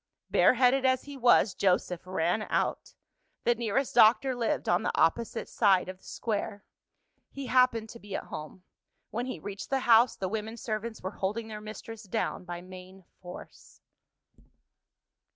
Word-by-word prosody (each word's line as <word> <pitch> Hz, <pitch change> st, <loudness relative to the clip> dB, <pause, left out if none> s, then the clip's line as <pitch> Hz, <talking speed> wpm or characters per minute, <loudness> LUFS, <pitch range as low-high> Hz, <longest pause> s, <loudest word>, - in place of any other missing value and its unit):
Bareheaded 255 Hz, +1 st, +4 dB
as 260 Hz, -1 st, +2 dB
he 285 Hz, -1 st, -9 dB
was, 240 Hz, -5 st, +4 dB
Joseph 180 Hz, -2 st, 0 dB
ran 185 Hz, +3 st, 0 dB
out. -, -, -1 dB, 0.5 s
The 240 Hz, -, +4 dB
nearest 235 Hz, +3 st, -1 dB
doctor 245 Hz, +3 st, +5 dB
lived 240 Hz, -2 st, -1 dB
on 175 Hz, +2 st, +3 dB
the -, -, -1 dB
opposite 215 Hz, +8 st, +1 dB
side 195 Hz, -5 st, +3 dB
of 185 Hz, 0 st, -8 dB
the -, -, -30 dB
Square. 205 Hz, -2 st, -4 dB, 0.6 s
He 275 Hz, -1 st, -7 dB
happened 250 Hz, -3 st, +3 dB
to 235 Hz, -, -10 dB
be 200 Hz, -2 st, -7 dB
at -, -, -3 dB
home. 155 Hz, +4 st, -9 dB, 0.5 s
When 240 Hz, +3 st, -3 dB
he 255 Hz, -, -4 dB
reached 195 Hz, +4 st, -7 dB
the 270 Hz, -1 st, 0 dB
house, 235 Hz, 0 st, +5 dB
the 190 Hz, -, -3 dB
women 220 Hz, +3 st, -4 dB
servants 220 Hz, -1 st, -4 dB
were 185 Hz, -, -3 dB
holding 215 Hz, +4 st, -2 dB
their 210 Hz, -1 st, -7 dB
mistress 215 Hz, +1 st, -8 dB
down 215 Hz, -3 st, -3 dB
by 175 Hz, -1 st, -6 dB
main 185 Hz, +1 st, -12 dB, 0.2 s
force. 180 Hz, -1 st, -12 dB
215 Hz, 155 wpm, -29 LUFS, 190-240 Hz, 0.6 s, doctor